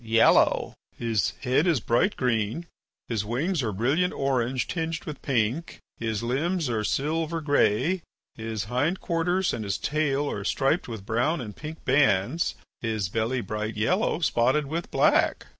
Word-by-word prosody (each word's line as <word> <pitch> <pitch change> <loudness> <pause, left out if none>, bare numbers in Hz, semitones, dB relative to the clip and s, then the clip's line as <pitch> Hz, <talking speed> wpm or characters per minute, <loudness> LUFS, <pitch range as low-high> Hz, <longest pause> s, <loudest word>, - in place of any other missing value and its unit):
"Yellow." 115 0 +4 0.2
"His 115 -3 0
head 135 +6 +2
is 165 -6 +3
bright 120 - +1
green, 115 +5 0 0.4
his 110 -4 -1
wings 140 - -1
are 110 -4 -1
brilliant 140 - +1
orange 130 -2 0
tinged 165 -1 -3
with 150 - -7
pink, 130 +4 -1 0.2
his 110 -2 -2
limbs 150 +4 0
are 110 -2 -1
silver 160 +7 -1
grey, 150 - +2 0.3
his 110 -2 -4
hind 130 - 0
quarters 175 +2 0
and 115 - -3
his 100 -2 -1
tail 145 -1 0
are 100 - -4
striped 135 - +1
with 110 -5 -7
brown 120 +10 +1
and 105 -5 -7
pink 155 +1 -8
bands, 130 - +2 0.3
his 110 -5 -1
belly 115 +5 -1
bright 105 +2 -4
yellow 180 - +1
spotted 135 0 +2
with 165 +5 -4
black." - - +2
130 Hz, 150 wpm, -26 LUFS, 110-160 Hz, 0.4 s, Yellow